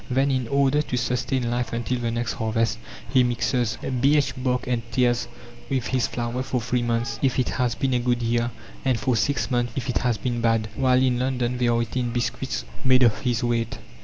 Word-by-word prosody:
Then, 135 +2 +2
in 130 -3 0
order 140 +2 +3
to 125 -4 -3
sustain 125 0 -1
life 120 0 -2
until 120 +2 -1
the 120 -1 -1
next 120 +1 -2
harvest, 110 0 0 0.3
he 130 - +6
mixes 120 -1 0
birch 140 +3 +2
bark 125 -1 -1
and 120 -2 0
tares 120 0 +2 0.4
with 130 -3 0
his 130 -2 +1
flour 120 +1 -3
for 130 -1 -1
three 125 +1 -1
months, 120 0 -1
if 130 -2 +1
it 130 - +1
has 125 -2 0
been 135 -2 0
a 125 - +2
good 120 0 0
year, 120 0 +1 0.3
and 130 -4 +1
for 130 -3 +1
six 140 +5 0
months 120 -1 0
if 135 0 -3
it 125 - +1
has 120 -3 +1
been 120 -2 -2
bad, 115 -1 +1
while 130 -1 +3
in 125 -2 +2
London 125 -1 -1
they 125 - +2
are 120 0 +2
eating 120 +1 -2
biscuits 120 - -2 0.2
made 130 -1 +5
of 115 -3 +3
his 120 -3 -1
wheat. 115 -1 0
125 Hz, 210 wpm, -24 LUFS, 120-130 Hz, 0.4 s, he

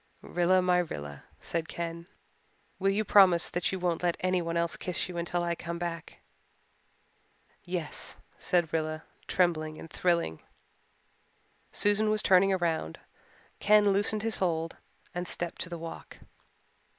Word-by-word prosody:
"Rilla 180 +1 +2
my 180 -1 +4
Rilla," 75 - -5 0.2
said 165 -1 -2
Ken, 170 0 -5 0.7
"will 195 +1 +2
you 205 +2 +1
promise 185 -4 +6
that 175 - -1
you 190 - -2
won't 175 -2 -1
let 175 -1 +1
anyone 180 -2 0
else 170 0 0
kiss 180 +1 -2
you 180 - -8
until 175 +1 -1
I 170 0 0
come 170 0 -5
back?" 170 -1 -5 1.5
"Yes," 175 -4 -4 0.2
said 175 -3 0
Rilla, 155 0 -1 0.2
trembling 155 -4 +1
and 165 - -10
thrilling. 170 - 0 1.3
Susan 205 +1 +3
was 215 0 +1
turning 195 +1 +5
round. 160 - -1 0.6
Ken 210 0 +5
loosened 205 +2 +2
his 225 0 +2
hold 165 -3 -1 0.4
and 175 0 -3
stepped 175 0 -3
to 180 - -4
the 170 - -5
walk. 165 0 -8
175 Hz, 140 wpm, -29 LUFS, 165-185 Hz, 1.5 s, promise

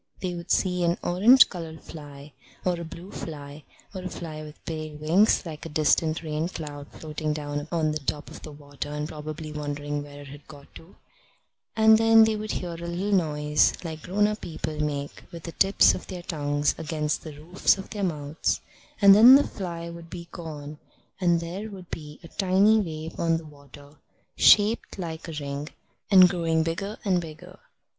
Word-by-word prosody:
They 185 -1 -3
would 170 0 -8
see 180 -2 +1
an 170 0 +2
orange 215 +10 +6
coloured 165 -3 -8
fly 145 -2 -11 0.3
or 180 -2 +1
a - - -5
blue 170 +3 -10
fly 145 -2 -8 0.3
or 190 - -5
a 185 - -5
fly 155 -3 -7
with 150 0 -12
pale 155 -2 -5
wings 170 +10 +3
like 155 -3 -7
a 165 - -6
distant 155 +1 +1
rain 155 +1 -2
cloud 145 -4 -7
floating 155 -1 -4
down 145 0 -4
on 160 -3 +1
the 155 - -2
top 145 +1 -4
of - - -10
the 155 - -9
water 145 -1 -8
and 150 0 -3
probably 155 0 -7
wondering 145 -1 -4
where 145 0 -10
it 140 - -11
had 145 +1 -13
got 145 -2 -14
to; 165 +3 -14 0.8
and 220 0 +6
then 225 0 +7
they 220 0 +2
would 215 0 -4
hear 175 -1 -4
a - - -7
little 180 +4 -2
noise 150 -5 +2
like 160 -2 -6
grown 200 +5 +1
up 210 0 -1
people 155 -2 -5
make 145 -1 -3
with 170 -1 -9
the 170 - -6
tips 195 +4 +4
of - - -7
their 180 -2 -7
tongues 145 -3 0
against 150 -1 -2
the 155 - -9
roofs 175 +6 +2
of 195 - -9
their 205 -2 -3
mouths; 150 -3 -1 0.4
and 200 0 +10
then 235 +6 +10
the 285 - +4
fly 170 -3 -6
would 170 0 -10
be 170 0 -8
gone, 150 -3 -8 0.4
and 175 -2 +3
there 185 +6 -5
would 185 -4 -11
be 150 -2 -7
a - - -9
tiny 200 +4 +3
wave 160 -4 -5
on 165 -1 +2
the 165 - -9
water, 145 0 -15 0.4
shaped 215 +2 +4
like 165 -2 -6
a 165 - -6
ring, 140 +1 -5 0.4
and 185 -3 +8
growing 165 -3 0
bigger 195 +6 -3
and 185 -3 +2
bigger. 175 +4 -11
160 Hz, 190 wpm, -26 LUFS, 150-180 Hz, 0.8 s, and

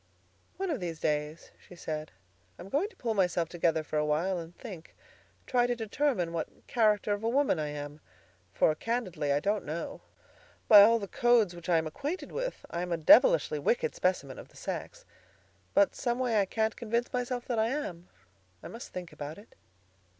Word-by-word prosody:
"One 385 -2 -2
of 285 - -2
these 170 -3 -5
days," 150 +1 -2
she 180 - -15
said, 155 -2 -5 0.5
"I'm 180 - -10
going 315 - 0
to - - -22
pull 230 -2 -2
myself 180 -5 +1
together 165 -2 +1
for 155 0 -2
a - - +1
while 170 +5 0
and 165 +1 -10
think—try 240 +4 -4
to 245 - 0
determine 225 - -1
what 165 -2 -5
character 215 -3 +2
of 205 +1 -4
a 225 - +1
woman 265 - +2
I 150 - -1
am; 145 0 -7 0.5
for, 155 - +3
candidly, 185 -7 -2
I 140 - +3
don't 205 +6 0
know. 160 +3 -5 0.7
By 210 -2 +10
all 230 +3 +6
the 200 -3 -5
codes 230 -5 +3
which 175 +1 -9
I 170 - +5
am 160 - 0
acquainted 290 - -4
with, - - -4
I 170 - -2
am 180 0 -4
a 170 - +1
devilishly 460 - +5
wicked 480 -1 +1
specimen 145 -8 -1
of - - -10
the - - -20
sex. - - -6 0.7
But 200 - +5
some 240 -1 -1
way 240 -5 +2
I - - +1
can't 220 +2 0
convince 235 +1 -2
myself 245 -1 -2
that 240 -3 -1
I 220 - +3
am. 195 - -4 0.5
I - - -7
must 230 +2 -9
think 175 -3 -7
about 150 +1 -7
it." 205 +3 -16
200 Hz, 190 wpm, -30 LUFS, 165-240 Hz, 0.7 s, By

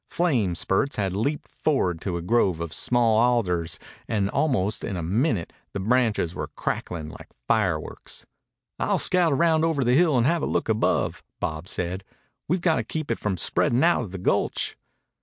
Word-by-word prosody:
Flame 125 - +1
spurts 95 +10 0
had 95 -3 -1
leaped 140 +10 -2
forward 90 - 0
to 90 -3 -2
a 85 - -5
grove 95 -4 +2
of 85 -1 -5
small 115 -3 +2
alders 100 -9 +1 0.3
and 100 -2 0
almost 110 -9 0
in 95 - -3
a 85 - -3
minute 105 - 0 0.2
the - - -3
branches 110 -5 +1
were - - -4
crackling 80 -3 -4
like - - -11 0.2
fireworks. 90 -8 -1 0.5
"I'll - - +1
scout 170 -6 +3
round 160 0 +3
over 160 -4 +1
the 120 0 +2
hill 155 -1 +4
and 120 - +3
have 165 +3 +2
a - - -1
look - - -1
above," 110 0 +1 0.2
Bob 80 +3 -3
said. 90 +1 -3 0.4
"We've 180 +3 0
got 165 -3 +2
to - - 0
keep 155 -5 -4
it 115 - -1
from 100 -3 -1
spreading 120 - +2
out 170 -3 +4
of 105 -7 -6
the 95 - -5
gulch." 90 - 0
110 Hz, 180 wpm, -25 LUFS, 90-140 Hz, 0.5 s, hill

